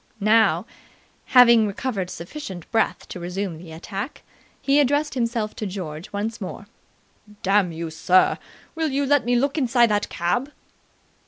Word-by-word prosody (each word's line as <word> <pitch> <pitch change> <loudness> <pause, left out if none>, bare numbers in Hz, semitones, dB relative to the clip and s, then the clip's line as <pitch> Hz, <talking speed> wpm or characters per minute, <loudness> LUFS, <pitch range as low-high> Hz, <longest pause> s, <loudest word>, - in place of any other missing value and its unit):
Now, 220 +2 +3 0.6
having 235 -4 +6
recovered 200 -3 -3
sufficient 180 - -8
breath 225 -1 0
to 180 - -7
resume 180 -1 -4
the 165 -1 -11
attack, 195 - -6 0.4
he 280 +1 +3
addressed 290 +2 +2
himself 230 -3 -2
to 215 - -3
George 175 -4 -6
once 215 +3 -4
more. 195 +1 -6 0.8
"Damn 195 -2 +3
you, 165 0 -5
sir, 180 +3 +3 0.3
will 320 -1 -1
you 280 +1 0
let 285 -3 +3
me 245 0 +2
look 280 +5 +1
inside 240 -3 +3
that 205 0 0
cab?" 245 +12 -1
215 Hz, 145 wpm, -23 LUFS, 185-255 Hz, 0.8 s, having